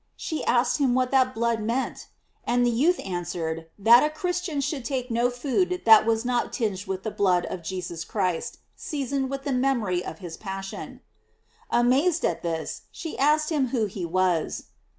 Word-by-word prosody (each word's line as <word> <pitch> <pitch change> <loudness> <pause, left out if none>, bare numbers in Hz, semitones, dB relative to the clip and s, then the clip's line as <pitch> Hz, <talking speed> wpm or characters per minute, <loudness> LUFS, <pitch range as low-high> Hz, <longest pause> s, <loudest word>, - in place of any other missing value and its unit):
She 315 - -4
asked 245 +4 +2
him 260 -4 +2
what 255 -1 +1
that 260 -1 +3
blood 230 0 0
meant? 235 +5 -2 0.4
And 245 0 +2
the 240 - +3
youth 310 +10 +2
answered, 170 -3 -3
that 230 +4 +7
a 300 - +2
Christian 345 0 -2
should 275 -1 -2
take 250 0 -3
no 235 +2 +2
food 295 +9 -1
that 220 -1 +8
was 225 +1 +1
not 245 -1 0
tinged 205 -4 -2
with 190 0 -3
the 220 - -3
blood 185 -4 +2
of 180 - -5
Jesus 175 -1 -5
Christ, 190 +4 -2 0.2
seasoned 275 -2 -3
with 275 0 -4
the 280 - -1
memory 240 -9 +1
of 160 - -7
his 170 -2 -8
passion. 195 -1 -7 0.7
Amazed 275 +9 +3
at 170 - -1
this, 165 -2 -4
she 325 - -6
asked 305 +3 +3
him 285 -4 +1
who 235 -3 0
he 195 -2 -6
was. 175 -1 0
240 Hz, 175 wpm, -25 LUFS, 185-270 Hz, 0.7 s, that